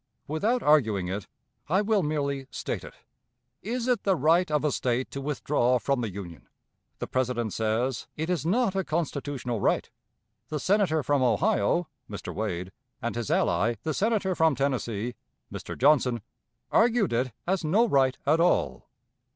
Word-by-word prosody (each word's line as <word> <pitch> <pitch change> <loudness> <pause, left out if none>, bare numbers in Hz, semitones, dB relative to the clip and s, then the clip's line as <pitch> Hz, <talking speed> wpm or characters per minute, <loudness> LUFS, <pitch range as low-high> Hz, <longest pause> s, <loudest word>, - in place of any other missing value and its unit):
Without 215 - 0
arguing 110 -12 +3
it, 100 +1 -4 0.4
I 190 +5 +3
will 210 -1 +2
merely 140 -3 -2
state - - -4
it. - - -11 0.7
It 210 - -8
is 245 -2 -1 0.2
the 195 -2 +2
right 165 +4 +3
of 150 0 +1
a 150 - +2
State 125 0 -1
to 140 - -5
withdraw 135 -3 +1
from 135 +1 0
the 115 - -2
Union. 90 -4 -9 0.5
The - - -4
President 125 -4 -1
says 110 +2 -1
it 160 +1 -2
is 180 -2 -1
not 195 +4 +1
a 190 - +1
constitutional 145 - -3
right. - - +1 0.6
The 150 - -2
Senator 185 -4 +2
from 140 +1 +1
Ohio 170 - +2 0.2
[Mr. 100 - -6
Wade], 95 -4 -3 0.3
and 120 - -3
his 120 -3 -3
ally, 105 +7 +2
the 155 - -1
Senator 205 0 +1
from 160 -3 +3
Tennessee 125 -4 -1 0.4
[Mr. - - -6
Johnson], 125 -4 +3 0.5
argued 225 - +3
it 125 +2 0
as 190 0 0
no 205 +10 +3
right 135 - +3
at 155 +4 +3
all. 175 +1 +1
140 Hz, 160 wpm, -27 LUFS, 120-175 Hz, 0.7 s, arguing